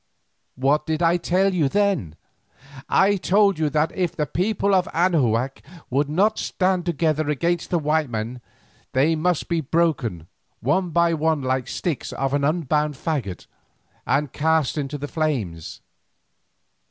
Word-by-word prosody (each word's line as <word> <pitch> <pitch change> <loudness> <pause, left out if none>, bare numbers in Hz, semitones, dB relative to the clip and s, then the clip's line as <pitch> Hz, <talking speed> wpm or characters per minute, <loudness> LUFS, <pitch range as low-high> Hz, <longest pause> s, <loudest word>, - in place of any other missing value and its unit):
What 140 +4 +1
did 160 +1 -1
I 170 +1 +4
tell 190 +3 +1
you 155 -6 +2
then? 195 - 0 0.7
I 200 +1 +4
told 200 -1 +3
you 155 -2 +1
that 150 +2 +1
if 180 -3 -1
the 150 -3 0
people 200 +5 0
of 185 -2 +3
Anahuac 135 -7 +1 0.3
would 140 +3 +1
not 200 +8 +2
stand 185 -1 0
together 155 -2 0
against 170 +4 -1
the 175 - +1
white 155 -2 0
men, 115 +2 -4 0.5
they 145 +5 +3
must 170 +1 0
be 170 -1 0
broken 135 - 0 0.3
one 175 +8 0
by 170 0 +2
one 160 -2 0
like 130 -1 0
the - - -8
sticks 170 -7 -3
of 135 0 -2
an 145 0 +1
unbound 150 -1 0
faggot, 130 - -3 0.6
and 140 +1 0
cast 160 -2 +1
into 145 -1 -3
the 145 +1 -5
flames. 125 - -3
155 Hz, 150 wpm, -23 LUFS, 135-175 Hz, 0.7 s, I